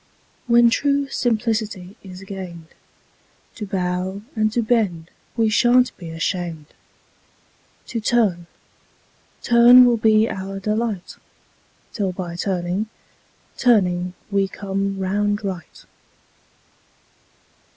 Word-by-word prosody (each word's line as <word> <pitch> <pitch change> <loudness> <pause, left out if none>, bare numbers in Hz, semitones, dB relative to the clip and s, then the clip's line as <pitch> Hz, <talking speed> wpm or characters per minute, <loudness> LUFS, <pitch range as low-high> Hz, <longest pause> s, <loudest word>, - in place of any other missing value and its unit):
When 235 -1 +5
true 280 +2 +1
simplicity 215 -6 -2
is 185 -1 -11
gain'd, 180 -4 -8 0.8
To 210 - -7
bow 185 +1 -2
and 215 -1 +1
to 235 +1 0
bend 200 -8 0 0.3
we 225 -1 +3
shan't 245 +3 +3
be 170 -3 -9
asham'd, 165 -1 -3 1.2
To 230 - -4
turn, 210 -7 +1 1.0
turn 240 +1 +7
will 240 -1 +3
be 220 0 +4
our 195 -1 -5
delight 210 -1 -3 0.8
'Till 195 -4 -2
by 175 -2 -6
turning, 180 +3 -2 0.7
turning 180 -6 +2 0.2
we 200 -1 +2
come 195 0 -3
round 205 +2 -1
right. 185 -4 -7
200 Hz, 100 wpm, -21 LUFS, 180-225 Hz, 1.2 s, turn